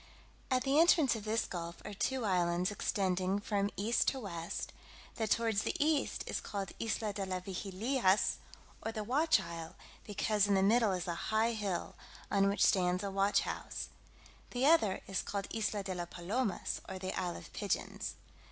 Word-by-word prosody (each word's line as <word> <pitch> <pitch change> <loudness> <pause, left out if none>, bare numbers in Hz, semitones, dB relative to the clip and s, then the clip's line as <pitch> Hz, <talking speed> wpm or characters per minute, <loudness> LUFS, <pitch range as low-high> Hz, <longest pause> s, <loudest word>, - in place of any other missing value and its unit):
At 255 -1 +2
the 275 +2 +3
entrance 320 -6 +5
of 215 -2 -6
this 220 +1 +1
gulf 170 -1 -5
are - - -5
two 250 +5 -1
islands 180 -1 +2
extending 190 -1 0
from 205 -1 0
east 215 +5 +2
to 270 - +1
west; 170 -7 -5 0.4
that 220 -2 -1
towards 225 -2 +2
the - - -2
east 300 -1 +1
is - - -3
called 195 -2 -4
Isla 220 -2 -1
de 200 -1 -3
las 185 -1 -3
Vigilias, 195 +3 +1 0.4
or 225 - -3
the 215 -1 -4
Watch 290 +5 +3
Isle; 170 -3 -7 0.3
because 210 0 +1
in 200 - +3
the 190 - +3
middle 220 0 +4
is 180 -1 -3
a 170 - 0 0.2
high 220 +2 +3
hill, 205 -6 -2 0.4
on 200 -1 +4
which 200 - +3
stands 180 0 +3
a 200 - -2
watch 195 +1 +3
house. - - -4 0.6
The 250 +2 0
other 280 - +4
is 195 - -1
called 200 -1 -3
Isla 210 -2 -1
de 190 -1 -3
la 175 -1 -3
Palomas, 190 +6 -2
or 190 - -4
the 185 0 -4
Isle 180 -1 -2
of 85 - -10
Pigeons. - - -2
200 Hz, 180 wpm, -34 LUFS, 185-225 Hz, 0.6 s, entrance